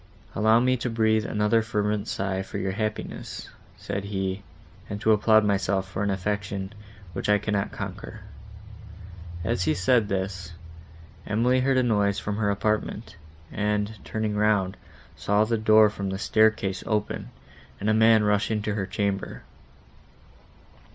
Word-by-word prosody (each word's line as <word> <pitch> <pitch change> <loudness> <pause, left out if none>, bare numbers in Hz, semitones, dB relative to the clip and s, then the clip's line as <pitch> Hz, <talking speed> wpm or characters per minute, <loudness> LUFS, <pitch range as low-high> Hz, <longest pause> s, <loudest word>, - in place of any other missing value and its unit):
"Allow 110 +2 +4
me 130 +1 +2
to 125 +1 -3
breathe 110 -1 +2
another 105 +2 +2
fervent 105 -1 -1
sigh 95 -1 -2
for - - -6
your 95 0 -1
happiness," 110 +2 -5 0.3
said 100 0 -4
he, 95 -1 -3 0.5
"and 105 - -4
to 110 +1 +2
applaud 110 0 +4
myself 95 -1 0
for 95 - -5
an 100 - 0
affection, 100 0 -3 0.4
which 100 - -3
I 105 - +5
cannot 105 -1 -2
conquer." - - -7 1.2
As 90 0 0
he - - +2
said 105 +3 +2
this, 95 -3 -3 0.7
Emily 120 +5 +2
heard 130 +1 +2
a 130 - +3
noise 105 -4 +2
from 105 0 -3
her 105 -2 +1
apartment, 105 +2 -2 0.4
and, 105 0 -1
turning 110 -1 -2
round, 105 -3 +2 0.4
saw 105 +1 +2
the 115 +1 0
door 110 0 +6
from 100 -2 -4
the 95 - -3
staircase 110 -2 +2
open, 105 -1 -2 0.5
and 105 - -3
a 110 - +4
man 110 0 +5
rush 105 -1 +1
into 105 -1 -1
her 100 -2 -2
chamber. 100 -1 -3
105 Hz, 145 wpm, -26 LUFS, 100-110 Hz, 1.2 s, door